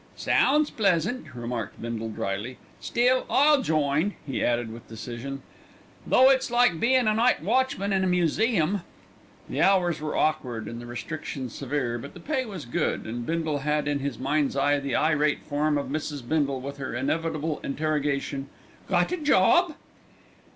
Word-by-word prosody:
"Sounds 300 +2 +2
pleasant," 200 +4 0
remarked 120 -3 -5
Bindle 115 -1 -4
drily; 105 +4 -4 0.2
"still, 250 +2 +2
I'll 290 0 +5
join," 155 - +1
he 135 -3 -2
added 120 -2 0
with 115 - -12
decision, 120 +4 -7 0.6
"though 260 +1 +6
it's 265 -1 +1
like 240 -8 +3
bein' 255 +1 +3
a 215 - +4
night 230 -4 +2
watchman 215 -2 +1
in 190 -1 +2
a - - +2
museum." 180 +1 +1 0.7
The - - -2
hours 180 -5 +3
were 155 -1 -2
awkward 120 -8 0
and 115 +1 -6
the 120 - -9
restrictions 120 +1 -5
severe, 130 -3 -2
but 140 - -10
the - - -9
pay 270 -3 -2
was 190 - -7
good, 120 - -1
and 120 +1 -5
Bindle 160 -3 -1
had 150 +1 0
in 145 -1 0
his 140 -3 -3
mind's 140 +2 0
eye 145 +1 +3
the 140 -1 -2
irate 150 -1 +2
form 150 0 0
of 140 - -3
Mrs. 145 -3 -4
Bindle 140 -3 0
with 140 +2 -6
her 135 -4 -5
inevitable 155 +3 -1
interrogation, 140 -2 -2 0.4
"Got - - +2
a 360 - 0
job?" 310 - +4
150 Hz, 160 wpm, -26 LUFS, 135-195 Hz, 0.7 s, though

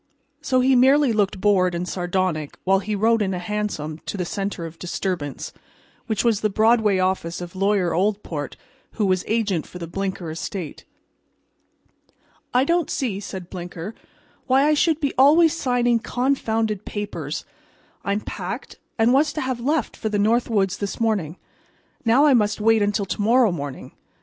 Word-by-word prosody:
So 255 -1 +2
he 260 +1 +4
merely 265 +1 +5
looked 200 -3 0
bored 185 -3 +3
and 175 +1 -3
sardonic 175 -5 -2
while 190 +1 +3
he 210 +2 -3
rode 225 +2 +2
in 190 -2 0
a - - -3
hansom 175 -5 -3
to - - -3
the 180 - -2
center 195 -2 -3
of 165 0 -10
disturbance, 175 -5 -4 0.5
which 220 -3 0
was 230 -4 +2
the 215 - +2
Broadway 220 -1 +3
office 185 -2 -1
of 175 0 -8
Lawyer 195 -2 +1
Oldport, 180 -6 -1 0.4
who 215 - 0
was 185 -1 +1
agent 210 -7 0
for - - -10
the 170 - -5
Blinker 185 -1 -4
estate. 165 0 -6 1.7
"I 250 +1 +3
don't 340 +2 +1
see," 225 -8 -2
said 190 -3 -8
Blinker, 175 +2 -6 0.5
"why 265 +1 +4
I 305 - +4
should 310 +1 +2
be 285 -3 -1
always 310 +4 +6
signing 245 -5 +1
confounded 225 -5 -1
papers. 205 0 -5 0.6
I 200 - 0
am 205 - -1
packed, - - -6 0.2
and 230 +2 +4
was 290 +3 +3
to 310 - -3
have 260 -2 -2
left 285 +2 -1
for 220 - -3
the 210 - -1
North 225 +5 +2
Woods 195 -4 +1
this 200 -1 -4
morning. 200 -8 0 0.7
Now 250 +5 +4
I 290 - +6
must 210 -3 +2
wait 225 +1 +4
until 205 0 +1
to 195 - -3
morrow 230 +1 +4
morning. 145 -5 -6
205 Hz, 170 wpm, -23 LUFS, 185-240 Hz, 1.7 s, always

